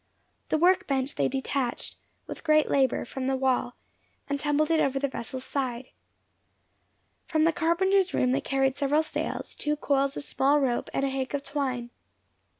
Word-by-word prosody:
The -, -, +2 dB
work 360 Hz, +4 st, +3 dB
bench 270 Hz, 0 st, 0 dB
they -, -, +1 dB
detached, 265 Hz, -1 st, -2 dB, 0.3 s
with -, -, -8 dB
great 310 Hz, -1 st, +3 dB
labour, 265 Hz, -3 st, +2 dB
from 260 Hz, +2 st, -4 dB
the 270 Hz, -, +1 dB
wall, 260 Hz, -2 st, 0 dB, 0.5 s
and 285 Hz, 0 st, -2 dB
tumbled 300 Hz, +2 st, +1 dB
it 325 Hz, -, +3 dB
over 275 Hz, -2 st, +1 dB
the 280 Hz, +1 st, 0 dB
vessel's 260 Hz, 0 st, -6 dB
side. 260 Hz, -3 st, -3 dB, 1.4 s
From 315 Hz, -2 st, +2 dB
the 330 Hz, +1 st, +3 dB
carpenter's 370 Hz, +3 st, +2 dB
room 250 Hz, -, +2 dB
they 265 Hz, -, +1 dB
carried 270 Hz, -1 st, +1 dB
several 290 Hz, +2 st, +2 dB
sails, 315 Hz, -, -4 dB
two 300 Hz, 0 st, -1 dB
coils 275 Hz, -2 st, 0 dB
of -, -, -5 dB
small 285 Hz, +1 st, +2 dB
rope, 255 Hz, -4 st, 0 dB
and 270 Hz, -, -1 dB
a 275 Hz, -, +1 dB
hank 265 Hz, +1 st, -2 dB
of 280 Hz, -, -3 dB
twine. 255 Hz, -5 st, -3 dB
275 Hz, 170 wpm, -27 LUFS, 265-305 Hz, 1.4 s, work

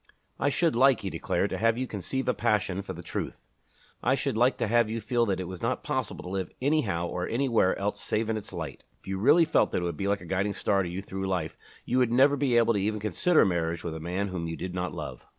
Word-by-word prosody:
"I 145 Hz, -, +2 dB
should 160 Hz, +1 st, +1 dB
like," 130 Hz, +1 st, +5 dB
he 95 Hz, -, -4 dB
declared, -, -, -1 dB
"to -, -, -2 dB
have 115 Hz, +1 st, +3 dB
you 130 Hz, -, -1 dB
conceive 125 Hz, +5 st, -3 dB
a 125 Hz, -, +3 dB
passion 105 Hz, -5 st, 0 dB
for 95 Hz, -1 st, -6 dB
the 85 Hz, 0 st, -9 dB
truth. -, -, -4 dB, 0.6 s
I -, -, +3 dB
should -, -, -2 dB
like 125 Hz, +3 st, +3 dB
to -, -, 0 dB
have 115 Hz, 0 st, +3 dB
you 115 Hz, +1 st, -2 dB
feel 120 Hz, +2 st, +1 dB
that 95 Hz, -2 st, 0 dB
it -, -, -2 dB
was 90 Hz, -2 st, -8 dB
not -, -, -1 dB
possible -, -, -3 dB
to -, -, -7 dB
live 95 Hz, -1 st, -3 dB
anyhow 125 Hz, -, +1 dB
or 90 Hz, +1 st, -3 dB
anywhere 115 Hz, -6 st, +2 dB
else 100 Hz, +1 st, -2 dB
save 110 Hz, +1 st, -1 dB
in 110 Hz, -, 0 dB
its 110 Hz, -, -6 dB
light. 80 Hz, -6 st, -6 dB, 0.2 s
If -, -, -26 dB
you 95 Hz, 0 st, -2 dB
really 150 Hz, -, +6 dB
felt -, -, +3 dB
that -, -, +1 dB
it 90 Hz, -, -1 dB
would 85 Hz, -3 st, -3 dB
be 100 Hz, -, -2 dB
like 100 Hz, 0 st, 0 dB
a -, -, -10 dB
guiding 95 Hz, +3 st, -1 dB
star 100 Hz, -1 st, +1 dB
to 90 Hz, -, -3 dB
you 90 Hz, +3 st, -5 dB
through 95 Hz, -1 st, -4 dB
life, 90 Hz, -4 st, -2 dB, 0.3 s
you 125 Hz, -, +1 dB
would 125 Hz, -2 st, +2 dB
never 135 Hz, +4 st, +5 dB
be 135 Hz, -4 st, +2 dB
able 115 Hz, -1 st, +4 dB
even 105 Hz, +2 st, 0 dB
to 105 Hz, -, -7 dB
consider 155 Hz, -, +3 dB
marriage 85 Hz, -3 st, -1 dB
with 85 Hz, -, -4 dB
a 80 Hz, -, -6 dB
man 90 Hz, +5 st, -2 dB
whom 90 Hz, -3 st, -3 dB
you 80 Hz, -, -4 dB
did 90 Hz, 0 st, -5 dB
not 90 Hz, -1 st, -2 dB
love." -, -, -7 dB
100 Hz, 270 wpm, -28 LUFS, 90-120 Hz, 0.6 s, really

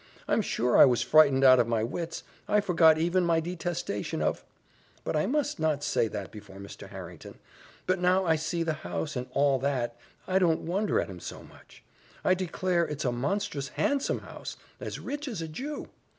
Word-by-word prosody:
I'm -, -, +2 dB
sure 120 Hz, +1 st, 0 dB
I -, -, +11 dB
was 120 Hz, -3 st, +2 dB
frightened 140 Hz, -3 st, +5 dB
out 130 Hz, -1 st, +8 dB
of 120 Hz, -, +3 dB
my 115 Hz, -2 st, 0 dB
wits 165 Hz, +8 st, -4 dB, 0.2 s
I 210 Hz, -, +3 dB
forgot 165 Hz, -5 st, +5 dB
even 175 Hz, +3 st, +2 dB
my 165 Hz, -1 st, +3 dB
detestation 170 Hz, -, -3 dB
of -, -, -1 dB, 0.6 s
But -, -, -2 dB
I 155 Hz, +4 st, +1 dB
must 290 Hz, -, -1 dB
not 155 Hz, -2 st, 0 dB
say 115 Hz, -, +1 dB
that 105 Hz, -1 st, -6 dB
before 100 Hz, -2 st, -12 dB
Mr. 100 Hz, 0 st, -10 dB
Harrington. -, -, -10 dB, 0.5 s
But 185 Hz, 0 st, +1 dB
now 185 Hz, +1 st, +3 dB
I 165 Hz, -2 st, +3 dB
see 165 Hz, +2 st, -2 dB
the 160 Hz, -1 st, 0 dB
house, 85 Hz, -2 st, -4 dB
and 125 Hz, 0 st, -3 dB
all 140 Hz, -2 st, +3 dB
that, 125 Hz, -3 st, -1 dB, 0.3 s
I 190 Hz, 0 st, +2 dB
don't 165 Hz, -4 st, +2 dB
wonder 195 Hz, +5 st, 0 dB
at -, -, -1 dB
him 95 Hz, -3 st, -9 dB
so -, -, -8 dB
much; -, -, -18 dB, 0.4 s
I 185 Hz, -, +5 dB
declare 185 Hz, -1 st, 0 dB
it's 150 Hz, -2 st, -4 dB
a 125 Hz, -, +2 dB
monstrous 145 Hz, +3 st, -2 dB
handsome 280 Hz, -, 0 dB
house -, -, -8 dB, 0.2 s
as -, -, -5 dB
rich 290 Hz, +1 st, -5 dB
as 225 Hz, -9 st, -4 dB
a 165 Hz, -, -4 dB
Jew! 275 Hz, -, -6 dB
160 Hz, 195 wpm, -28 LUFS, 130-185 Hz, 0.6 s, I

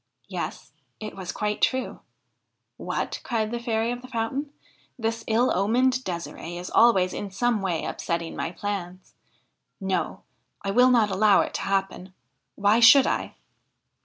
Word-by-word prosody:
Yes, -, -, -6 dB, 0.3 s
it 215 Hz, -1 st, -7 dB
was 185 Hz, -2 st, -5 dB
quite 210 Hz, 0 st, -2 dB
true. 260 Hz, 0 st, 0 dB, 0.4 s
' -, -, -53 dB, 0.3 s
What! -, -, -3 dB
' -, -, -28 dB
cried 220 Hz, -3 st, -1 dB
the 240 Hz, -, -2 dB
Fairy 230 Hz, 0 st, -1 dB
of 245 Hz, 0 st, -5 dB
the 255 Hz, -, -11 dB
Fountain, 260 Hz, +4 st, -3 dB, 0.2 s
' -, -, -36 dB
this 225 Hz, -1 st, -2 dB
ill 230 Hz, +3 st, +2 dB
omened 250 Hz, +7 st, +2 dB
De"siree 175 Hz, -2 st, -6 dB
is 180 Hz, +1 st, -7 dB
always 190 Hz, -6 st, +4 dB
in 205 Hz, -, -5 dB
some 225 Hz, +2 st, 0 dB
way 180 Hz, -4 st, -1 dB
upsetting 170 Hz, -1 st, -3 dB
my -, -, -2 dB
plans. 185 Hz, -2 st, -6 dB, 0.7 s
No! 190 Hz, -2 st, -2 dB, 0.4 s
I 195 Hz, -, -1 dB
will 250 Hz, +5 st, +5 dB
not 225 Hz, -5 st, +3 dB
allow 200 Hz, +1 st, +4 dB
it -, -, -3 dB
to -, -, -3 dB
happen: 195 Hz, -1 st, -2 dB, 0.4 s
why 205 Hz, +3 st, +3 dB
should 260 Hz, +3 st, +8 dB
I -, -, -2 dB
215 Hz, 160 wpm, -25 LUFS, 190-240 Hz, 0.7 s, should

